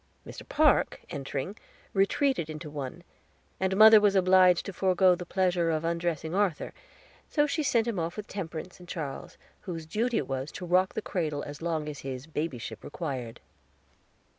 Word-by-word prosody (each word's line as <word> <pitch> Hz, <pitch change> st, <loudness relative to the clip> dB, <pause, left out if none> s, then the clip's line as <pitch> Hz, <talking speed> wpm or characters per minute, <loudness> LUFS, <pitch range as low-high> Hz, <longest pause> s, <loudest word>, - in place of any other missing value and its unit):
Mr. -, -, -10 dB
Park, 300 Hz, -2 st, +3 dB
entering, 140 Hz, +4 st, -4 dB, 0.4 s
retreated 200 Hz, -, +1 dB
into 155 Hz, 0 st, -7 dB
one, 145 Hz, +3 st, -6 dB, 0.6 s
and 190 Hz, 0 st, 0 dB
mother 220 Hz, 0 st, +9 dB
was 205 Hz, -1 st, +3 dB
obliged 185 Hz, -1 st, +5 dB
to 200 Hz, -, -5 dB
forego 185 Hz, 0 st, +4 dB
the 175 Hz, 0 st, -5 dB
pleasure 180 Hz, -3 st, +1 dB
of 160 Hz, 0 st, -1 dB
undressing 170 Hz, -1 st, -2 dB
Arthur; 195 Hz, -4 st, 0 dB, 0.6 s
so 295 Hz, -1 st, +3 dB
she 300 Hz, +2 st, -1 dB
sent 240 Hz, -6 st, +2 dB
him 230 Hz, -6 st, -2 dB
off 165 Hz, +3 st, -3 dB
with 210 Hz, -, -5 dB
Temperance 175 Hz, -2 st, -6 dB
and 180 Hz, 0 st, -14 dB
Charles, 150 Hz, -6 st, -6 dB, 0.2 s
whose 170 Hz, -5 st, -6 dB
duty 225 Hz, +8 st, 0 dB
it -, -, -1 dB
was 135 Hz, +2 st, -3 dB
to 180 Hz, -, -6 dB
rock 185 Hz, +2 st, +2 dB
the 220 Hz, -, -3 dB
cradle 155 Hz, -6 st, -2 dB
as 145 Hz, +1 st, -8 dB
long 160 Hz, -2 st, -2 dB
as 145 Hz, -2 st, -6 dB
his 130 Hz, 0 st, -6 dB
babyship 150 Hz, -6 st, -5 dB
required. 130 Hz, -7 st, -5 dB
175 Hz, 165 wpm, -28 LUFS, 155-195 Hz, 0.6 s, mother